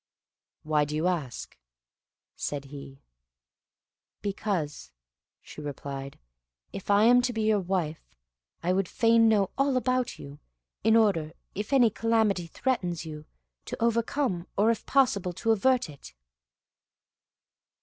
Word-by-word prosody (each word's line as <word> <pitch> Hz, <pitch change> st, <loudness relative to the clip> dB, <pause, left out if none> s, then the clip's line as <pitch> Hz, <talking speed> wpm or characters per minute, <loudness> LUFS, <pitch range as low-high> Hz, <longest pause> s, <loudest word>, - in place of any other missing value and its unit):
"Why 155 Hz, -1 st, +2 dB
do 150 Hz, +1 st, -4 dB
you 155 Hz, +2 st, 0 dB
ask?" 155 Hz, -10 st, -3 dB, 0.8 s
said 140 Hz, -1 st, -4 dB
he. 140 Hz, -1 st, -10 dB, 1.2 s
"Because," 195 Hz, -7 st, -3 dB, 0.5 s
she -, -, -10 dB
replied. 140 Hz, -1 st, -6 dB, 0.6 s
"if 195 Hz, -, -8 dB
I 205 Hz, +1 st, +5 dB
am 245 Hz, +2 st, +6 dB
to 250 Hz, 0 st, 0 dB
be 225 Hz, -2 st, -2 dB
your 215 Hz, -1 st, +3 dB
wife, 175 Hz, -4 st, -2 dB, 0.6 s
I 180 Hz, +2 st, +2 dB
would 190 Hz, -1 st, +1 dB
fain 230 Hz, +2 st, +4 dB
know 205 Hz, -3 st, +2 dB
all 275 Hz, -1 st, +3 dB
about 255 Hz, -1 st, 0 dB
you, 140 Hz, +1 st, -11 dB, 0.4 s
in 220 Hz, +1 st, +4 dB
order, 190 Hz, -9 st, +2 dB, 0.2 s
if 210 Hz, +5 st, -5 dB
any 245 Hz, -5 st, +5 dB
calamity 220 Hz, -5 st, +1 dB
threatens 180 Hz, -7 st, -2 dB
you, 155 Hz, -1 st, -8 dB, 0.4 s
to -, -, -5 dB
overcome, 230 Hz, -4 st, 0 dB
or 215 Hz, +3 st, +4 dB
if 230 Hz, -, -4 dB
possible 205 Hz, -10 st, +2 dB
to 225 Hz, +6 st, 0 dB
avert 245 Hz, +3 st, +2 dB
it." 140 Hz, -, -13 dB
195 Hz, 130 wpm, -28 LUFS, 155-230 Hz, 1.2 s, am